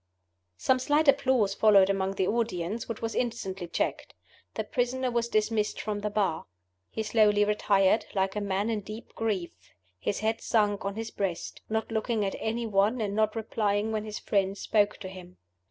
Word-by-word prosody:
Some 260 -1 +2
slight 295 +4 +2
applause 260 -7 +3
followed 200 -2 +6
among 195 0 0
the 190 - +1
audience, 220 -1 -2
which 230 - -5
was 225 - -2
instantly 195 -7 -3
checked. - - -2 0.4
The - - -1
prisoner 255 -1 -1
was 235 0 0
dismissed 215 -1 0
from 210 0 -3
the 210 +1 -2
Bar. 200 -6 -1 0.4
He 220 - -3
slowly 210 -1 +4
retired, 205 -1 +2
like 195 0 0
a 210 - -1
man 200 +2 -1
in 215 -2 -1
deep 215 +3 -9
grief: 205 -6 -2 0.5
his 200 - -2
head 220 +1 0
sunk 205 -3 +1
on 200 0 -2
his 225 0 -5
breast 190 -4 -3
not 220 +1 -2
looking 220 -1 0
at 195 - -2
any 230 +2 -2
one, 210 +3 +2
and 205 -2 -2
not 215 0 +1
replying 215 -1 0
when 215 -1 -1
his 215 -1 -5
friends 195 -1 0
spoke 210 -1 +2
to 190 - -5
him. 185 -1 -11
210 Hz, 180 wpm, -28 LUFS, 195-225 Hz, 0.5 s, followed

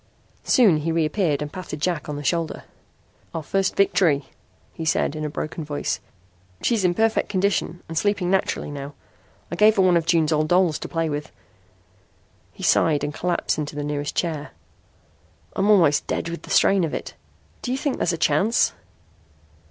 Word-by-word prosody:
Soon 215 - +5
he 155 +2 -2
reappeared 160 -2 +1
and 150 - -8
patted 180 -5 -6
Jack 165 -1 -2
on 150 - -3
the 145 - -6
shoulder. 165 +1 -1 0.7
"Our 165 - -3
first 195 +5 0
victory," 165 -8 +3 0.5
he 165 - -6
said 160 -2 +1
in 155 - -4
a 150 - -2
broken 155 +2 -5
voice. 145 -1 -3 0.6
"She's 230 -5 +1
in 175 -1 +2
perfect 225 +2 +1
condition 190 -3 -1
and 165 - -7
sleeping 195 0 +1
naturally 190 -5 0
now. 140 0 -7 0.6
I - - -2
gave 210 +4 +5
her 195 - +4
one 180 -1 +4
of 165 -1 -2
June's 165 -2 +3
old 155 0 +1
dolls 175 -2 +3
to - - -5
play 165 -1 -1
with." 145 -1 -4 1.2
He - - -11
sighed 150 -3 +3
and 145 0 -2
collapsed 175 -1 -1
into 150 -1 -4
the 145 - -3
nearest 145 0 -3
chair. 160 -4 -2 1.0
"I'm 200 +2 +1
almost 165 -8 +4
dead 170 - -2
with 170 - -6
the - - -13
strain 195 -2 +4
of 160 - -2
it. - - -6 0.5
Do - - -5
you 260 - 0
think 285 -1 -1
there's - - +1
a 170 - -2
chance?" 190 +11 +2
165 Hz, 180 wpm, -23 LUFS, 150-190 Hz, 1.2 s, Soon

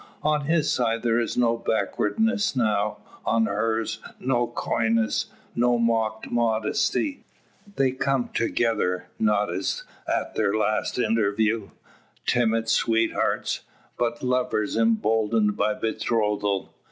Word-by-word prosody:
On 150 -1 +1
his 160 0 +2
side 115 -2 0
there 115 -1 +2
is 115 - -2
no 120 -1 +3
backwardness 200 - 0
now; 105 -4 +1 0.3
on 115 0 +2
hers 110 +2 -1 0.2
no 120 -2 +1
coyness, 115 -1 0 0.3
no 120 0 +2
mock 115 -2 0
modesty. 120 - 0 0.5
They 135 -1 +2
come 130 -1 0
together 115 -6 0
not 105 -3 +2
as 95 +2 -2 0.3
at - - -1
their 100 - +1
last 110 0 0
interview, 110 -2 +1 0.6
timid 115 -2 +2
sweethearts, 115 0 +1 0.4
but 120 0 -2
lovers 125 -4 0
emboldened 110 -1 +2
by 105 - +1
betrothal. 105 -3 -1
115 Hz, 110 wpm, -25 LUFS, 110-120 Hz, 0.6 s, no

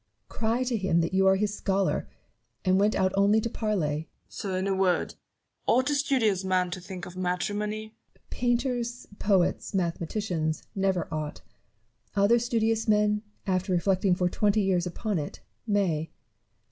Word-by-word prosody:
Cry 230 +3 0
to 250 -1 -1
him 190 -4 +2
that 165 +2 -2
you 190 0 +4
are 190 - +6
his 205 +1 0
scholar, 195 -1 0 0.6
and 185 +1 +4
went 210 +2 +3
out 185 0 +2
only 200 +2 +4
to 230 +1 -3
parley. 210 -8 0
Newton. 150 +2 -3 0.2
Sir! 190 -2 -4
in 185 - -1
a 195 - +1
word 190 -2 +1 0.3
— - - -46
ought 260 +4 +3
a - - +2
studious 250 -9 +2
man 185 -1 +1
to 185 - -5
think 185 0 -7
of 180 - -10
matrimony? 210 +4 -2 0.2
Barrow. - - -30
Painters, 245 0 -1
poets, 195 -1 +1
mathematicians, 170 -2 -1
never 190 -3 0
ought: 155 -1 -4 0.7
other 205 +4 +4
studious 225 -1 0
men, 210 0 +3 0.2
after 185 -1 0
reflecting 185 +1 +2
for 180 0 +1
twenty 210 +3 +2
years 180 -2 +1
upon 200 +1 -2
it, 145 - -6 0.3
may. 180 -7 +1
195 Hz, 160 wpm, -27 LUFS, 180-215 Hz, 0.7 s, are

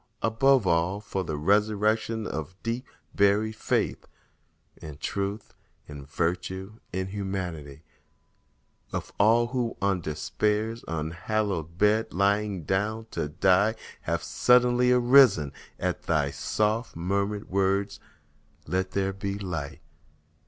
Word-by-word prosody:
above 125 +1 +3
all, 85 +3 +1
For 100 -2 -3
the 80 -3 -4
resurrection 105 +5 +1
of 80 +1 -5
deep 115 +2 -3 0.3
buried 105 +2 +2
faith - - -1 0.7
In 75 -3 -9
Truth—in 100 -7 -6
Virtue—in 95 +4 -3
Humanity— 90 -7 -5 1.1
Of - - -4
all 115 +3 +5
who, 125 -3 -2
on 100 -2 +1
Despair's 105 +9 -1
unhallowed 85 +2 -2
bed 105 +1 +2
Lying 100 -1 +1
down 105 +6 -1
to 75 - -2
die, 95 +7 +3 0.3
have - - -2
suddenly 125 0 +4
arisen 120 - +5 0.3
At - - -1
thy 75 -3 0
soft 110 - -1
murmured 100 +4 -1
words, 100 +1 +1 0.7
"Let 95 +1 -2
there 95 0 0
be 100 +1 -4
light!" 85 -8 -5
100 Hz, 105 wpm, -27 LUFS, 90-110 Hz, 1.1 s, all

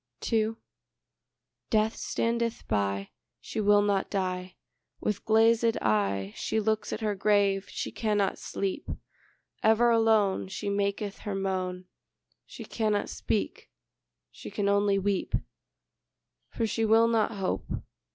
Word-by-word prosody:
II 220 0 +2 1.1
Death 220 0 +2
standeth 230 0 -1
by; 100 -2 -1 0.3
She 220 - -4
will 205 0 +5
not 200 -2 +1
die; 185 -2 -2 0.4
With 210 -2 -2
glazèd 225 +1 +4
eye 100 -2 0
She 220 - -1
looks 220 0 0
at 215 - -4
her 215 -1 0
grave: 200 -1 +2
she - - -4
cannot 210 -3 0
sleep; 195 -1 -3 0.7
Ever 225 +2 +4
alone 220 -5 +3
She 195 +1 -4
maketh 200 0 -1
her 205 -2 -4
moan: 185 -1 -2 0.6
She - - -9
cannot 215 -2 0
speak; 105 -4 -2 0.6
she - - -9
can 200 - -1
only 200 0 +3
weep; 195 -1 0 1.1
For 230 - -1
she 225 +1 -1
will 225 +1 +5
not 230 -1 +1
hope. 195 -3 -2
205 Hz, 120 wpm, -28 LUFS, 190-220 Hz, 1.1 s, will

